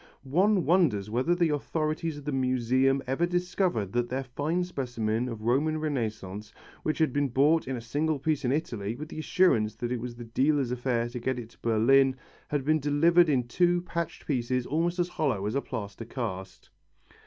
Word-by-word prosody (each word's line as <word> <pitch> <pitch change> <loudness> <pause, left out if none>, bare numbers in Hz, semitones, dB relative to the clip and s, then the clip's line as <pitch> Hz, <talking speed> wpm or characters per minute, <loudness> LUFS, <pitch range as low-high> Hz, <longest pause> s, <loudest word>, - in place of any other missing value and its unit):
One 185 +8 +2
wonders 130 - +2
whether 130 +10 +1
the 175 -2 +2
authorities 155 +1 -2
of 145 - -10
the 150 - -1
Museum 130 +1 +2
ever 135 +7 0
discovered 175 - -1
that 120 0 0
their 130 +2 -2
fine 145 +7 -1
specimen 120 -7 -2
of 110 -2 -7
Roman 145 +7 +1
Renaissance, 110 -9 -3 0.3
which 155 - -1
had 160 -5 +2
been 145 0 +1
bought 145 +6 +3
in 130 - -2
a 120 - -5
single 145 +6 -1
piece 150 +1 -1
in 125 - +1
Italy, 115 -8 -2
with 155 +4 -7
the - - -7
assurance 155 -11 +2
that 120 0 -4
it 125 -2 -2
was 120 -1 -6
the 120 - -8
dealer's 135 +2 +1
affair 120 -1 0
to 120 +1 -6
get 130 +2 -1
it 115 -2 -7
to - - -23
Berlin, 130 +4 +4 0.3
had 145 -2 -2
been 155 +1 +3
delivered 160 +4 +4
in 130 -4 +2
two 175 +6 +2
patched 170 -2 -4
pieces 125 -2 -1
almost 170 +4 0
as 175 -1 +1
hollow 135 - -1
as 105 - -1
a 140 - 0
plaster 110 -3 -6
cast. 105 -6 -6
135 Hz, 190 wpm, -28 LUFS, 120-155 Hz, 0.3 s, Berlin